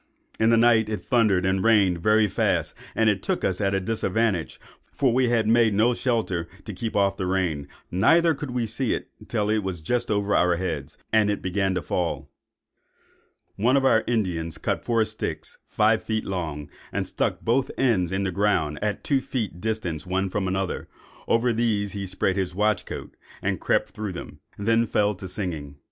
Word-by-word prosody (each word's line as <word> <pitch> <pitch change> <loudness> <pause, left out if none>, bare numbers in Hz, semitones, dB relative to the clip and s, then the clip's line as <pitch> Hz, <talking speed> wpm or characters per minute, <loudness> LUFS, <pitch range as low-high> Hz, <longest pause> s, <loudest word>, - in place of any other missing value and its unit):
In 110 - +4
the 115 - +5
night 115 -2 +4
it 105 -4 -3
thundered 105 -6 +2
and 95 0 +1
rained 100 -6 +4
very 110 +2 +4
fast, - - 0 0.2
and 105 -4 +2
took - - -2
us 95 +1 0
at 100 -1 +1
a - - +2
disadvantage; 105 -2 -1 0.3
for 130 -4 +1
we 125 -1 +3
had 115 -2 +2
made 115 -2 +4
no 115 +4 +4
shelter 110 -9 -1 0.2
to 105 - -6
keep 110 +4 -4
off 100 -1 +2
the 95 - -2
rain, 90 -7 -1 0.2
neither 165 - +4
could 145 -1 -6
we 125 -1 -1
see 115 +3 -1
it - - -7 0.2
till 105 -1 0 0.2
just 90 +9 -2
over 100 -1 +1
our 90 -1 +3
heads, 80 -6 -4 0.2
and 110 -2 +4
it 105 - -2
began 95 +1 0
to 90 - -2
fall. 90 -2 -2 1.3
"One 125 +6 +3
of 135 - +2
our 110 -4 +4
Indians 90 -9 -1
cut - - -2
four 115 -2 +2
sticks, 110 0 -6
five 110 +1 +2
feet 110 -1 -2
long, 80 -6 -4 0.2
and - - -1
stuck - - -2
both 125 +3 +1
ends 100 -10 +2
in 95 +1 -1
the 95 - -1
ground, 85 -7 +1
at 105 -1 -2
two 140 -2 +1
feet 110 -10 -4
distance 95 -9 -3
one 95 +1 -1
from 95 -1 -1
another; 95 0 -2 0.4
over 115 +1 +2
these 110 -3 0
he 100 -1 -5
spread 95 0 0
his 90 -2 -2
watch 105 +1 +1
coat, - - -7 0.2
and - - -2
crept - - +1
through 105 -3 -5
them, 90 - -8 0.2
and 100 - -5
then 115 0 +3
fell 105 0 +2
to 95 0 -8
singing. 80 -8 -4
105 Hz, 190 wpm, -25 LUFS, 95-115 Hz, 1.3 s, the